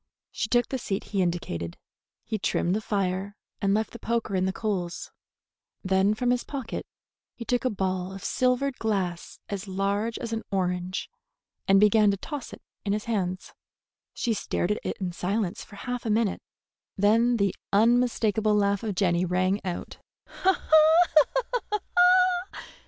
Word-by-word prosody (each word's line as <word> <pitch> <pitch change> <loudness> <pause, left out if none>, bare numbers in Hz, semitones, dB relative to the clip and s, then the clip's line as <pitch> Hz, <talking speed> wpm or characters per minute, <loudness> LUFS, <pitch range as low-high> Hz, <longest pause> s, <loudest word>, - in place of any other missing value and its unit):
She 215 - -3
took 240 0 +2
the 265 - -2
seat 195 -3 -3
he 195 - +2
indicated. 85 - -2 0.5
He 220 -2 -3
trimmed 180 -1 0
the 215 - -1
fire 195 -1 -2 0.3
and 200 -1 +2
left 220 0 -1
the 235 - -9
poker 230 -3 -1
in 185 0 +1
the 190 - +1
coals. 190 -4 -3 0.7
Then 190 +2 +2
from 245 +2 +1
his 250 -1 +1
pocket 270 -5 -5 0.5
he 235 - -7
took 245 +1 0
a - - +3
ball 190 -3 -2
of 195 0 -9
silvered 255 +1 0
glass 190 -6 -2
as 200 0 -5
large 200 +4 -1
as 230 -1 -5
an 225 - -1
orange, 180 -1 -1 0.6
and 195 0 +6
began 210 0 +5
to 200 - +1
toss 285 +5 -6
it - - -12 0.2
in 200 - 0
his 210 0 -2
hands. 185 -5 -2 0.6
She 235 - -1
stared 200 -2 -1
at 210 - 0
it - - -3
in 185 -2 -2
silence 185 +2 -2
for 205 - -14
half 245 +4 -4
a 225 - -3
minute. 215 -1 +1 0.6
Then 230 +4 +4
the 200 -3 +1 0.2
unmistakable 220 -1 +3
laugh 200 -1 +2
of 215 -4 -3
Jenny 180 -2 +2
rang 185 +3 0
out. 180 -2 -5
200 Hz, 155 wpm, -27 LUFS, 185-225 Hz, 0.7 s, and